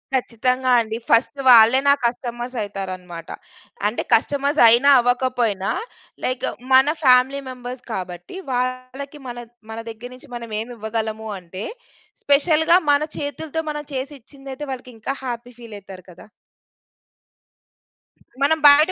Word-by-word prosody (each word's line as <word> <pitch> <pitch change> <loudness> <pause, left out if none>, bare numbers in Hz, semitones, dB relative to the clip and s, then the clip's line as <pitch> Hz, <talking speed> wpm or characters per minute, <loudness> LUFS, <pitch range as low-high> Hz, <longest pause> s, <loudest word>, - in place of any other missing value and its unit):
ఖచ్చితంగా 255 +1 0
అండి. 220 0 -4
ఫస్ట్ 240 +4 +3
వాళ్ళే 235 +1 +8
నా 280 - +7
కస్టమర్స్ 240 +1 -3
అయితారనమాట. 185 -4 -6 0.6
అంటే, 215 - -2
కస్టమర్స్ 280 +5 +2
అయినా, 240 +5 +6
అవకపోయినా, 245 -5 0 0.5
లైక్ 255 0 -1 0.3
మన 260 +1 +7 0.2
ఫ్యామిలీ 260 +1 +4
మెంబర్స్ 250 0 -8
కాబట్టి, 180 - -6
వాళ్ళకి 255 +3 -4
మన 240 -1 -6 0.3
మన 220 - -6
దగ్గర 230 +2 -9
నించి 260 +3 -15
మనమేమివ్వగలము 220 -1 -4
అంటే, 185 +2 -8 0.6
స్పెషల్‌గా 320 +4 +4
మన 285 0 +3 0.2
చేతులతో 305 +2 -4
మనం 295 0 -6
చేసి 270 +2 -4
ఇచ్చిందైతే, 270 +2 -10
వాళ్ళకింకా 250 0 -6
హ్యాపీ 245 0 -6
ఫీల్ 230 -3 -10
అయితారు 190 -2 -13
కదా! 175 - -15 2.1
మనం 305 +3 +3
బయట 295 +4 +7
250 Hz, 115 wpm, -21 LUFS, 220-275 Hz, 2.1 s, వాళ్ళే